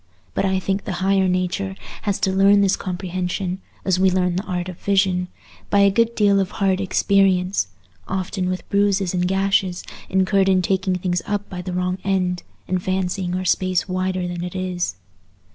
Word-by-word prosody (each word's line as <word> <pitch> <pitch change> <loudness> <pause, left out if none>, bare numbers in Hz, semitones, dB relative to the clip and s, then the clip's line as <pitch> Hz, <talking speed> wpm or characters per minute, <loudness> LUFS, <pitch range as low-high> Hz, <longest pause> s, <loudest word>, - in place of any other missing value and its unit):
But - - 0
I 190 0 +1
think 195 +1 -2
the 195 - -3
higher 195 -1 +3
nature 185 +1 -1 0.3
has 200 -2 -1
to 190 - +2
learn 200 +1 +5
this 195 -1 +3
comprehension, 185 0 -3 0.2
as 185 -1 +2
we 190 0 +5
learn 180 -1 +1
the 185 - 0
art 180 -1 -3
of 180 -2 -8
vision, 190 -2 +1 0.4
by 200 - +4
a 200 0 +5
good 230 +3 +2
deal 200 -2 +4
of 190 -1 0
hard 195 -2 0
experience, 195 -1 +2 0.4
often 185 -1 -2
with 185 0 -4
bruises 200 -2 +2
and 180 0 +1
gashes 190 -1 +1 0.3
incurred 190 +1 +3
in 185 -1 +3
taking 190 0 +1
things 180 -1 -1
up 205 0 -2
by 180 -1 -4
the 180 +1 -5
wrong 180 +1 -1
end, 185 -2 0 0.3
and 185 0 0
fancying 185 -1 -1
our 185 0 -2
space 185 0 +1
wider 185 -1 -1
than 175 -1 -4
it 180 +1 -6
is. 180 - -2
185 Hz, 180 wpm, -22 LUFS, 180-195 Hz, 0.4 s, learn